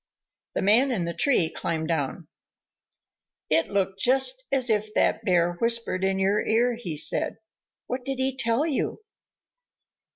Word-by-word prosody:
The - - -1
Man 230 +8 +4
in 190 -8 -1
the 170 - -4
tree 250 - +2
climbed 160 0 -4
down. 145 -5 -3 1.2
"It 160 +1 +3
looked 195 -1 -1
just 270 - +3
as 265 -2 +1
if 215 0 -1
that - - +1
Bear 175 -3 +2
whispered 230 -5 +1
in 190 0 +1
your 195 +2 +1
ear," 240 +3 +1
he 185 -10 -5
said. - - +1 0.5
"What 250 0 -5
did 270 0 -3
he 260 0 0
tell 235 +3 +1
you?" 325 +7 -2
220 Hz, 150 wpm, -25 LUFS, 185-255 Hz, 1.2 s, Man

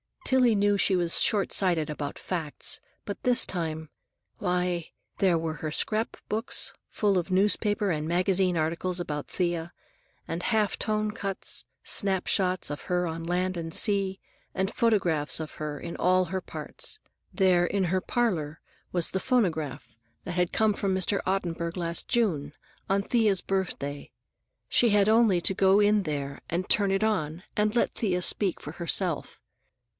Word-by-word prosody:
Tillie 250 -4 +4
knew 205 0 +3
she 190 0 +3
was 175 -2 +3
short 205 -3 +2
sighted 170 -6 +2
about 145 -1 -4
facts, 165 -5 -1 0.3
but 205 - -5
this 250 -1 +4
time—Why, 175 +1 -4 0.3
there 185 -4 +3
were 160 -1 -3
her 155 0 -4
scrapbooks, 220 +4 -1 0.2
full 205 -3 +1
of 175 +1 -1
newspaper 205 +1 +2
and 155 -1 -2
magazine 180 +1 +2
articles 170 +3 -1
about 150 -4 -4
Thea, 175 -2 -2 0.5
and 165 +1 -3
half 215 0 +1
tone 215 -1 0
cuts, 195 -3 -3 0.2
snap 190 -2 +2
shots 185 -4 +1
of 145 - -6
her 180 -1 0
on 165 0 -5
land 180 +1 -1
and 165 -1 -5
sea, 195 -2 +1 0.4
and 190 +3 -1
photographs 180 - +2
of 155 -1 -6
her 150 -1 -4
in 170 - -7
all 185 +1 +3
her 190 +1 -3
parts. 435 - -6 0.3
There, 185 -3 +3
in 195 +1 0
her 185 +2 0
parlor, 175 -13 -1 0.3
was 175 -2 +1
the 190 - -1
phonograph 165 - -1 0.2
that - - -5
had 180 0 0
come 220 -1 +3
from 195 -1 0
Mr. 190 +2 0
Ottenburg 170 -3 -1
last 170 -2 -2
June, 165 - 0 0.4
on 195 +1 +2
Thea's 215 -4 +2
birthday; 160 -7 -3 0.6
she 240 - +4
had 205 0 +4
only 220 -5 +4
to 195 - +2
go 190 +1 +4
in 205 0 +3
there 140 -4 -4
and 175 +2 -2
turn 200 -2 +3
it 195 +2 +1
on, 180 -6 -1
and 210 +1 +1
let 240 - +1
Thea 185 -5 0
speak 195 -1 0
for 150 - -7
herself. 170 -1 -1
185 Hz, 155 wpm, -27 LUFS, 165-205 Hz, 0.6 s, Tillie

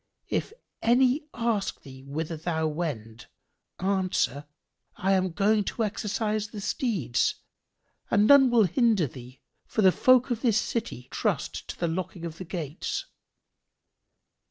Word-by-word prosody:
[FN#3] - - -52
If - - -4 0.3
any 255 +5 +3
ask 230 -4 -1
thee 130 -2 -11
whither 155 +4 -4
thou 160 0 -2
wend, 140 -9 -4 0.5
answer, 185 -7 0 0.5
'I 195 - 0
am 185 -1 +2
going 205 +4 +2
to 230 - -2
exercise 215 0 -1
the 210 0 -8
steeds,' 195 - 0 0.7
and 205 +1 +4
none 275 +1 +7
will 235 -2 +5
hinder 215 - +3
thee; 125 0 -11 0.3
for 215 - 0
the 190 - +7
folk 255 +4 +4
of 230 -2 -1
this 225 -4 +3
city 200 - -4
trust - - -2
to - - -8
the 170 - 0
locking 170 0 -4
of 165 0 -7
the 185 - -6
gates." 160 -3 -4
190 Hz, 140 wpm, -27 LUFS, 160-225 Hz, 0.7 s, none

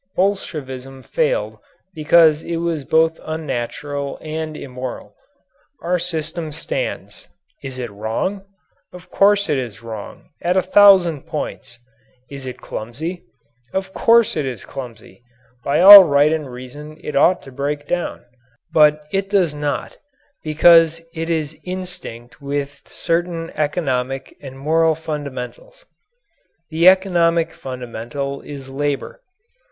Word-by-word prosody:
Bolshevism 135 -9 -3
failed - - -1 0.3
because 160 -1 +4
it 170 - -4
was 165 -3 -2
both 160 +2 +2
unnatural 145 -2 -4
and 155 0 -5
immoral. 130 -1 -7 0.7
Our 175 +1 0
system 165 -1 -3
stands. - - -5 0.4
Is 135 -2 -6
it 120 -3 -5
wrong? 110 - -3 0.5
Of 180 -1 -14
course 200 0 +3
it 145 - +1
is 115 -4 -7
wrong, 110 -3 -9
at 180 +2 +1
a 185 - +3
thousand 185 -6 +5
points! 140 -5 -6 0.5
Is 135 -2 -8
it 125 - -6
clumsy? 155 +11 -6 0.5
Of 190 0 -3
course 230 0 +4
it 155 - -1
is 130 -4 -5
clumsy. 120 -3 -10 0.4
By 145 +4 +1
all 200 +1 +12
right 145 0 +3
and 155 -4 -3
reason 145 +5 -10
it 150 - -5
ought 175 +6 +3
to 135 - -12
break 145 +2 -3
down. 175 -7 -3 0.5
But 150 -1 +4
it 195 0 -1
does 185 -6 +2
not 145 -1 -4 0.4
because 165 +1 +5
it 165 +1 -4
is 155 -2 -2
instinct 180 -11 -7
with 140 0 -5
certain 170 -1 -2
economic 135 -4 -2
and 135 -2 -10
moral 160 +3 +2
fundamentals. 150 - -7 0.9
The 165 +3 +3
economic 170 -3 +2
fundamental 125 +2 -6
is 140 -2 -9
labour. 145 - -3
155 Hz, 125 wpm, -20 LUFS, 135-175 Hz, 0.9 s, all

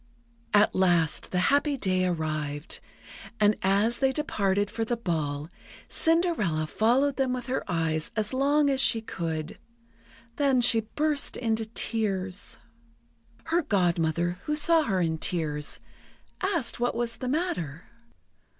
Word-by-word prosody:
At 205 0 +4
last 175 -4 +2
the 180 - -2 0.2
happy 285 0 +2
day 185 -5 +1
arrived, 155 -3 -3 0.6
and 210 0 +4
as 200 +5 +2
they 270 -1 +3
departed 205 -8 0
for 225 0 -2
the 235 +1 -1
ball, 155 -8 -2 0.4
Cinderella 325 - +1
followed 255 - +1
them 265 -2 +1
with 250 -1 -4
her 260 +1 -2
eyes 160 -2 -1
as 215 +2 -1
long 285 +3 +3
as 270 -1 +1
she 230 - +4
could. 165 -6 -5 0.8
Then 275 -3 +3
she 235 -1 +5 0.2
burst 300 -1 +1
into 225 -2 -1
tears. 200 -4 -2 0.9
Her 330 +2 +1
Godmother, 175 - 0
who 300 - 0
saw 325 +2 +4
her 190 -6 0
in 160 -2 -1
tears, 155 -5 -2 0.6
asked 335 -13 -1
what 245 0 0
was 230 -1 -2
the 255 - -4
matter. 185 - -2
210 Hz, 130 wpm, -27 LUFS, 170-265 Hz, 0.9 s, she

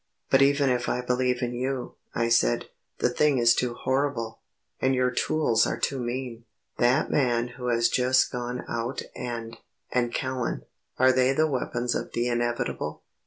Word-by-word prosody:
"But 135 - +6
even 140 -1 +4
if 125 0 0
I 125 - 0
believe 125 0 0
you," 125 +2 -3 0.2
I 115 - +1
said, - - +2 0.3
"the - - +2
thing 145 +2 +2
is 120 -1 +5
too 120 0 -1
horrible, 130 -4 -1 0.4
and 130 0 +2
your 125 0 +2
tools 120 -4 +2
are - - -2
too 135 - -1
mean; 120 -1 -4 0.3
that 125 +5 +3
man 120 -3 +1
who 125 +1 -7
has 115 -1 +3
just 130 +2 +2
gone 125 0 -4
out 120 +3 -3
and 115 -2 -5 0.3
and 120 -1 +1
Callan 130 -1 -2 0.3
are 130 +1 +5
they 130 +1 +3
the 155 +3 +3
weapons 125 -4 -1
of - - -4
the 120 +1 0
inevitable? 120 0 -2
125 Hz, 165 wpm, -26 LUFS, 120-130 Hz, 0.4 s, But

